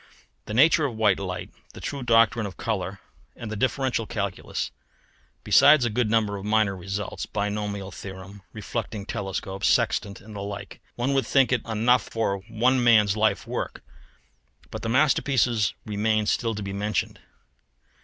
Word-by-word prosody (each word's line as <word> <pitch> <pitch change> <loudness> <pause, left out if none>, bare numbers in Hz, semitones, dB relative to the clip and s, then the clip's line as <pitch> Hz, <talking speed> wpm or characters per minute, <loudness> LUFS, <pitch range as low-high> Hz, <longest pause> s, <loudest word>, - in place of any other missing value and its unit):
The 105 - -4
nature 155 +3 +5
of 120 - -7
white 105 -4 +3
light, 90 -2 -5 0.2
the - - -10
true 140 -1 -5
doctrine 115 -2 +3
of 95 - -10
colour, 95 -3 -3 0.4
and 110 -2 -7
the - - -3
differential 130 0 0
calculus! 100 -4 -3 0.7
besides 150 -5 +6
a 120 - 0
good 115 0 0
number 105 -2 +1
of 95 - -8
minor 105 -2 +2
results 95 +2 -5
binomial 105 -1 -3
theorem, 95 +2 -9
reflecting 110 -1 -5
telescope, 95 -2 -4
sextant, 110 -3 +1
and 105 +1 -12
the 100 - -5
like; 100 0 -7
one 125 +3 0
would 135 -1 +1
think 135 -2 +3
it 125 -3 +1
enough 115 +3 +3
for 110 -3 -1
one 125 +3 +2
man's 105 -4 +5
life 110 -2 +1
work, - - -5 0.9
but - - -6
the 115 - -3
masterpiece 130 -4 +2
remains 110 0 +1
still 115 -2 -1
to 105 - -5
be 100 0 -5
mentioned. 105 +2 -2
110 Hz, 155 wpm, -25 LUFS, 100-120 Hz, 0.9 s, besides